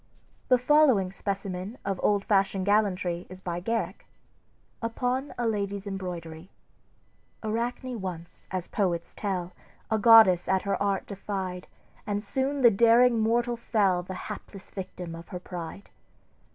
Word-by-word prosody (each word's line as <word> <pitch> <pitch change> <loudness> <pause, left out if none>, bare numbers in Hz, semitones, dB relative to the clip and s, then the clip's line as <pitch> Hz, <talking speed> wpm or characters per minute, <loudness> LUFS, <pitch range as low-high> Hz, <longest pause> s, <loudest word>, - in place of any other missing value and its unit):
The 255 - +5
following 250 -8 +4
specimen 195 +2 -4
of 195 -2 -2
old 205 -1 +2
fashioned 195 -2 +2
gallantry 190 -4 +1
is 185 0 -9
by 175 -2 -4
Garrick: 200 -1 -3 0.7
"UPON 250 +4 -1
A 240 - -1
LADY'S 200 -2 -2
EMBROIDERY 180 -3 -6 0.9
"Arachne 235 +2 -2
once, 175 -3 -6
as 185 -2 -3
poets 175 -5 -1
tell, 185 -3 -3 0.4
A 220 - +2
goddess 215 -5 +7
at 190 0 +2
her 200 0 -1
art 200 -1 0
defied, 190 -2 -5 0.4
And 205 0 -1
soon 270 +5 -1
the 240 -2 +8
daring 235 +3 +5
mortal 235 +2 +1
fell 205 -6 +1
The 185 +1 -7
hapless 195 -1 -9
victim 180 -3 -6
of 165 +1 -9
her 180 - -6
pride. 175 +2 -8
200 Hz, 135 wpm, -27 LUFS, 185-230 Hz, 0.9 s, the